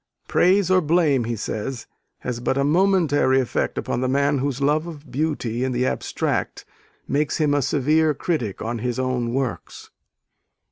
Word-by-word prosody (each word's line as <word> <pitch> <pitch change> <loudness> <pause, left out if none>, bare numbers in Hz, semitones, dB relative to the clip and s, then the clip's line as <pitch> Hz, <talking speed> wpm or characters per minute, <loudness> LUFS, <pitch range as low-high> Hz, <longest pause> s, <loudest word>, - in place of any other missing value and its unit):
"Praise 185 0 +3
or 185 0 +5
blame," 150 -6 +2
he 115 0 -2
says, 115 +3 -4 0.4
"has 125 -2 -4
but 130 +2 -1
a 140 - +2
momentary 155 -5 +3
effect 125 - -1
upon 120 - -2
the 130 - 0
man 140 +2 +1
whose 135 -1 -2
love 150 +4 +1
of 150 -5 -10
beauty 130 -4 -1
in 130 -1 -1
the 125 +1 0
abstract - - -2 0.4
makes 145 +2 0
him 150 -3 +2
a 145 - +2
severe 150 +3 +2
critic 125 - -2
on 115 +1 -3
his 125 +1 -2
own 130 -2 -1
works.... 130 -3 -4
140 Hz, 160 wpm, -22 LUFS, 125-155 Hz, 0.4 s, or